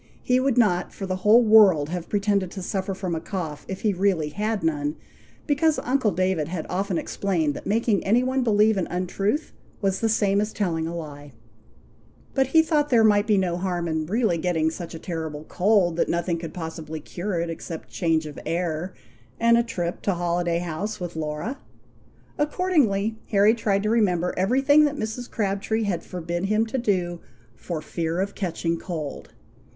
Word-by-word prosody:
He 250 0 +3
would 260 -1 +1
not, 180 -7 +2
for 195 - -6
the 185 -1 -2
whole 215 +6 +5
world 200 -9 +6
have 175 0 -5
pretended 200 -2 +1
to 190 - -6
suffer 190 +1 -2
from 185 -2 -3
a 165 - -1
cough 160 -6 -5
if 190 - -5
he 210 -2 +2
really 180 -5 +1
had 210 +4 -2
none, 150 -1 0 0.5
because 305 +1 +2
uncle 255 -3 +2
David 185 -5 0
had 165 -1 -4
often 190 -1 -1
explained 165 -7 -1
that - - -8
making 220 -1 +1
any 230 +5 +3
one 260 +1 0
believe 215 -1 +3
an 185 - -1
un 180 +2 -2
truth 205 - -1 0.3
was 195 -1 0
the 225 - +1
same 205 -2 +2
as 210 +1 -3
telling 165 -6 -1
a 170 - -5
lie; 145 -4 -8 1.0
but 265 -1 +2
he 320 +4 +5
thought 300 -2 +1
there 235 -4 +5
might 210 -1 +4
be 210 -2 +4
no 180 -2 0
harm 175 -2 -2
in 160 -1 -2
really 215 -3 +1
getting 160 -2 +1
such 165 0 -7
a - - -5
terrible 160 -3 -5
cold, 180 -1 +2
that - - +1
nothing 170 0 0
could 165 -2 -6
possibly 160 -2 -6
cure 175 +4 -4
it 170 0 -2
except 165 0 -7
change 165 -3 +1
of 150 -2 -8
air, 170 +2 -2 0.4
and 235 0 +5
a 235 - +5
trip 175 -7 -3
to 195 - 0
Holiday 175 0 0
House 175 +5 -4
with 175 -2 -5
Laura. 155 - -4 0.8
Accordingly 285 - +1
Harry 205 +1 +5
tried 205 -4 0
to 215 - +1
remember 180 -6 +2
every 235 +9 +1
thing 290 +2 +6
that 290 0 -1
Mrs. 220 +2 -4
Crabtree 205 +1 -1
had 185 -5 -1
forbid 175 0 -4
him 215 +2 +2
to 245 +4 -3
do 180 -6 0 0.4
"for 155 +4 -5
fear 165 +1 -2
of 200 +1 -1
catching 170 -3 -2
cold." 155 -5 -6
190 Hz, 190 wpm, -24 LUFS, 170-220 Hz, 1.0 s, world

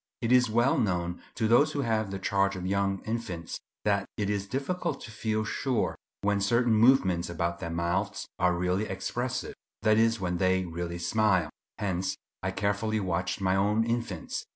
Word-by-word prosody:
It 115 0 -1
is 125 -2 +5
well 120 +5 +3
known 90 -5 -1
to 110 -1 +1
those 140 +7 +5
who 145 - 0
have 110 -4 0
the 95 - -4
charge 100 +1 +1
of 90 0 -5
young 95 0 0
infants, 110 -8 -4 0.3
that 100 -1 +2
it 105 -1 0
is 100 -1 -2
difficult 165 - -2
to 115 - -9
feel 110 0 -1
sure 125 +2 -1 0.3
when 100 0 +1
certain 115 +3 +3
movements 105 -7 +4
about 85 0 -2
their 85 - -4
mouths 90 +5 -1
are 90 -1 +3
really 90 +4 0
expressive; 120 +6 -3 0.3
that 110 0 +4
is, 115 0 +3
when 90 -2 -1
they 95 0 +2
really 85 0 -4
smile. 90 -1 +2 0.3
Hence 95 -2 -1 0.3
I 95 - -1
carefully 105 +3 0
watched 90 0 -1
my 95 0 +2
own 105 +3 +2
infants. 115 -6 -3
100 Hz, 175 wpm, -29 LUFS, 90-115 Hz, 0.3 s, is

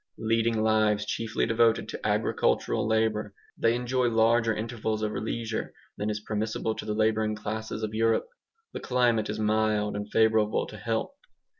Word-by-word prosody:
Leading 115 0 +1
lives 110 -1 +2
chiefly 115 +1 -1
devoted 115 0 +2
to - - -5
agricultural - - +1
labour, 110 -2 0 0.2
they 115 +1 +2
enjoy 125 +1 0
larger 115 0 +3
intervals 110 -1 -3
of 105 - 0
leisure 110 0 -3 0.2
than 105 - -2
is 105 0 -2
permissible 110 +1 -2
to - - -7
the 105 - -2
labouring 110 0 +1
classes 110 +1 -5
of 110 0 -3
Europe. 115 +1 +1 0.5
The - - -4
climate 120 -4 +1
is 105 - -3
mild, 105 -1 +1
and 105 0 -4
favourable 110 -1 +2
to 110 - -10
health. 115 - -2
110 Hz, 155 wpm, -27 LUFS, 105-115 Hz, 0.5 s, larger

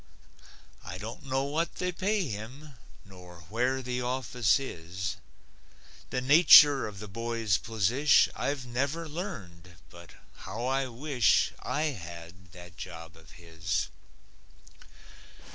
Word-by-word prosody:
I 90 - -7
don't 115 +9 -8
know 135 +1 0
what 155 +4 -2
they 180 0 -2
pay 190 +1 -1
him, 130 +7 -8 0.3
Nor 90 -3 -14
where 130 +3 0
the 125 0 -3
office 125 -3 +1
is. 95 -5 -5 0.9
The 125 - -2
nature 145 0 +8
of 105 -2 -9
the 105 +2 -8
boy's 115 -1 -1
posish 115 +7 +3
I've 140 -2 -2
never 140 +7 -2
learned 95 - -8 0.2
but 85 -1 -14 0.2
how 110 +6 -6
I 135 +1 0
wish 125 -3 +2
I 150 - -2
had 85 -1 -11
that 90 0 -13
job 85 -2 -9
of 80 0 -18
his! 80 -1 -3
115 Hz, 120 wpm, -29 LUFS, 90-135 Hz, 0.9 s, nature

